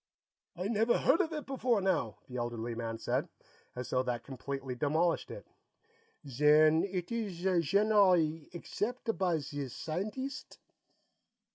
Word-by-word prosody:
"I 180 +2 -3
never 225 +2 +2
heard 335 - +4
of 330 -3 -2
it 305 -2 -4
before 255 -4 +1
now," 170 - 0
the 125 - -6
elderly 120 -1 -3
man 115 0 -4
said, - - -1 0.5
as 125 0 -5
though 125 - +2
that 125 -2 -3
completely 135 0 -5
demolished 155 +6 +1
it. - - -8 0.8
"Zen 150 +4 +5
eet 185 -1 -4
ees 215 -7 -3
zhenerally 180 -3 +3
accept' 225 +6 -3
by 180 -3 +1
zee 145 -1 -4
scienteest'?" 215 - -5
170 Hz, 130 wpm, -32 LUFS, 135-210 Hz, 0.8 s, Zen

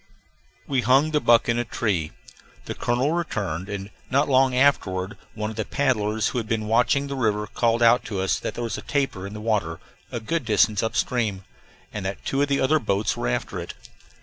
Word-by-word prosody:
We 135 -3 0
hung 135 +6 +3
the 150 - +2
buck 120 0 +4
in 120 0 +1
a - - +1
tree. 95 -9 -1 0.5
The - - -4
colonel 125 +5 0
returned, 100 - -2
and 100 0 -5 0.2
not 140 +3 +2
long 130 -1 +3
afterward 105 -8 +2 0.2
one 105 0 -3
of 110 - -10
the 110 - 0
paddlers 110 -5 0
who 125 - -2
had 110 - -5
been 110 -1 -1
watching 120 +5 +2
the 140 0 -4
river 105 -4 0
called 115 +3 +1
out 115 +1 +5
to 100 -4 -4
us 95 -2 0
that - - -5
there 120 - -3
was 115 -2 -3
a - - -8
tapir 135 -10 -2
in 100 - -9
the 105 - -7
water, 105 -7 -1 0.3
a - - -3
good 160 +7 -2
distance 105 -2 +3
up 115 0 -2
stream, 110 -7 0 0.5
and 105 - -4
that 95 +1 -5
two 135 - 0
of 145 - +2
the 140 -1 +1
other 155 +4 +3
boats 105 -3 0
were - - -2
after - - -2
it. - - -7
115 Hz, 215 wpm, -24 LUFS, 105-130 Hz, 0.5 s, out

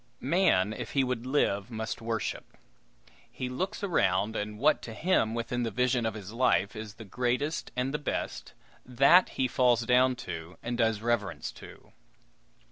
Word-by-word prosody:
Man, 110 - +3
if - - -6
he 135 - +3
would 125 -1 -3
live, 105 -7 +1
must 110 -1 -4
worship. 115 -1 -4 0.7
He 130 - -5
looks 185 +10 -3
around, 100 - +1
and 105 0 -3
what 150 +7 +3
to 115 - -8
him, 115 -10 +1
within 120 +1 -2
the 115 - 0
vision 125 -1 +1
of 110 - -3
his 105 -1 -8
life, 115 -3 +2
is 110 -1 -7
the 110 - -10
greatest 125 - -1
and 125 +2 -1
the 150 - -1
best, 145 - -4 0.3
that 140 +9 +5
he 130 - +2
falls 125 -1 +3
down 125 +1 +4 0.5
and 120 +1 -2
does 110 -2 +1
reverence 105 -9 -1
to. - - -14
120 Hz, 160 wpm, -29 LUFS, 110-130 Hz, 0.7 s, that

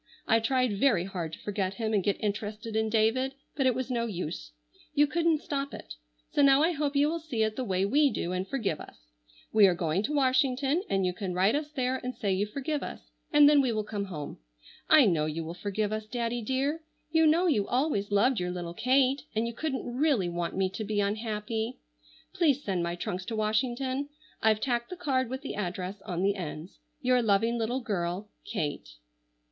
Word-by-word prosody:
I 225 - +5
tried 250 -3 +1
very 220 -10 +3
hard 175 -4 -5
to - - -7
forget 195 -2 -2
him 220 -2 -2
and 200 -3 +2
get 200 - 0
interested 210 +1 -3
in 220 0 +1
David, 230 +5 +2 0.2
but 270 -3 +2
it 255 - +3
was 255 0 -3
no 235 -1 0
use. 155 - -5 0.4
You 295 0 +6
couldn't 325 0 +1
stop 280 -1 -3
it. - - -9 0.4
So - - +2
now 275 +1 +6
I 335 - +3
hope 295 -3 -1
you 285 +1 +4
will 335 +2 -1
see 265 -9 -1
it 215 0 -1
the 260 - -2
way 190 -4 0
we 285 +7 +4
do 175 - -3
and 185 +1 -2
forgive 220 - -2
us. - - -11 0.6
We 215 -2 +7
are 180 - +2
going 165 +1 0
to 285 +8 -2
Washington 270 +3 +2
and 195 -1 +1
you 180 - 0
can 185 -1 -4
write 190 +4 +3
us 295 +1 -1
there 260 -3 -1
and 250 -1 -5
say 200 -4 0
you 200 +3 0
forgive 280 +6 -3
us, - - -8 0.2
and 295 -1 +7
then 290 -1 +6
we 255 -3 +1
will 215 -1 -1
come 205 -1 -4
home. 150 - -7 0.5
I 310 -4 +8
know 160 -6 +2
you 160 +2 -3
will 165 +1 -6
forgive 205 +3 -2
us, 215 0 -4
Daddy 240 0 -2
dear. 270 +7 -1 0.3
You 320 -1 +5
know 330 +4 +4
you 235 - +2
always 250 -6 0
loved 215 +5 +3
your 180 0 -2
little 175 -1 -5
Kate 260 +5 +2
and 220 +2 +1
you 235 - -3
couldn't 270 +2 -3
really 245 - +1
want 175 +1 -3
me 190 -1 +2
to 205 +3 -4
be 210 0 -1
unhappy. 220 +2 -2 0.6
Please 290 -5 +2
send 190 -3 -1
my 170 0 -2
trunks 185 0 -4
to 225 - -4
Washington. 255 +6 0 0.3
I've 220 -1 +3
tacked 240 -3 -1
the 365 - -5
card 265 -8 0
with 260 +2 -5
the - - -4
address 190 0 -4
on 180 0 -2
the 200 +1 +3
ends. 170 -2 -7 0.2
"Your 250 0 +4
loving 225 +2 +2
little 240 +4 -1
girl, 195 -2 -3
"KATE." 145 - -4
225 Hz, 210 wpm, -29 LUFS, 195-270 Hz, 0.6 s, I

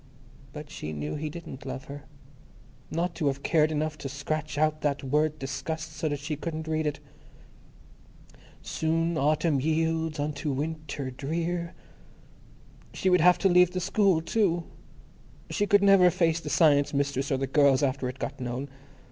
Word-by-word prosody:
But 150 0 -9
she 75 - -6
knew 75 0 -4
he 155 +1 -3
didn't 160 -3 -9
love 130 0 -6
her. 140 0 -9 0.8
Not 170 +2 -1
to 155 -3 -1
have 140 0 -1
cared 155 -1 +3
enough 155 0 -2
to 135 - -5
scratch 145 +2 -3
out 155 0 +1
that 145 -1 -1
word 150 +3 +1
"disgust," 155 +4 -5
so 155 0 -1
that 145 - -2
she 150 +2 -4
couldn't 160 +1 -5
read 155 -1 0
it! 145 -1 -3 1.6
Soon 165 +1 0
Autumn 155 0 +2
yields 160 +1 0
unto 145 0 -2
Winter 145 -2 -4
Drear. 170 +6 -3 1.2
She 190 - +1
would 180 -2 +5
have 180 +2 +6
to 195 - +2
leave 180 -1 +5
the 185 - -1
school, 185 -2 +2
too. 175 -3 +1 0.9
She 205 - 0
could 205 0 +4
never 195 -2 +7
face 170 -2 +1
the - - -6
Science 145 -3 +3
Mistress 140 0 -1
or 135 - +2
the 135 - -1
girls 140 -1 +3
after 130 -1 0
it 130 - -7
got - - -5
known. 125 +3 -4
155 Hz, 165 wpm, -27 LUFS, 140-165 Hz, 1.6 s, never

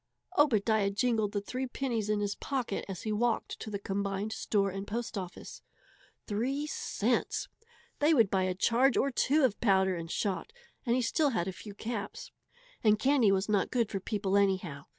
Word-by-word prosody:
Obadiah 220 - +3
jingled 215 0 +1
the 205 - -1
three 255 +5 -4
pennies 240 -5 -2
in 210 -1 +1
his 205 0 0
pocket 255 -7 -3
as 185 -3 -6
he 215 - -2
walked 230 +2 0
to - - -6
the 205 - -3
combined 200 +1 -2
store 200 -3 0
and 195 +1 -5
post 230 +2 -3
office. 185 -3 -7 0.6
Three 255 +8 -1
cents! 300 - -1 0.5
They 295 +2 +4
would 225 -7 +4
buy 190 -1 +2
a 185 -1 -1
charge 240 +7 +3
or 275 - +2
two 285 +4 +2
of 245 -6 +1
powder 190 -4 +3
and 165 -1 -6
shot, 200 - -2 0.4
and 235 - +3
he 255 - +1
still 290 +6 +2
had 205 -8 -1
a - - -1
few 205 +2 -10
caps. 220 -1 -5 0.5
And 215 -1 +5
candy 260 -3 +4
was 195 0 +1
not 205 -3 +1
good 235 -4 0
for 195 - -2
people 200 0 -1
anyhow! 185 -8 0
210 Hz, 185 wpm, -31 LUFS, 195-240 Hz, 0.6 s, And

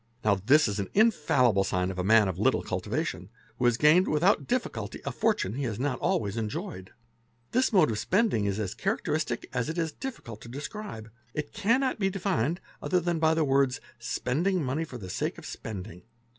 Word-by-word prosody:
Now 105 - +5
this 125 +11 +4
is 105 0 -2
an 100 - -3
infallible 140 - +4
sign 90 0 0
of 95 - -6
a - - 0
man 110 +1 +5
of 95 - -3
little - - +2
cultivation, - - -3
.— - - -31
who 125 - +1
has 120 -1 +4
gained 155 +7 +5
without 170 +7 +2
difficulty 125 - -2
a - - -1
fortune 95 - 0
he 140 +4 -3
has 110 -2 -3
not 135 0 -1
always 105 0 0
enjoyed. 115 - -4 0.6
This 255 +2 +2
mode 180 - +4
of 105 - -2
spending 190 - +2
is 100 +1 -1
as 100 -4 -2
characteristic - - -2
as 125 +3 -1
it 160 - -4
is 165 -2 0
difficult 150 - -7
to 115 - -10
describe; 140 - -7 0.2
it 150 - -4
cannot 235 +5 +1
be 195 -2 +2
defined 180 - -1 0.2
otherwise 180 -2 0
than 170 -2 0
by 160 0 +3
the 160 - +2
words—spending 135 +5 0
money 140 +5 -1
for 130 - -8
the 100 -6 -8
sake 90 - -2
of - - -10
spending. 90 -5 -7
135 Hz, 195 wpm, -28 LUFS, 110-180 Hz, 0.6 s, Now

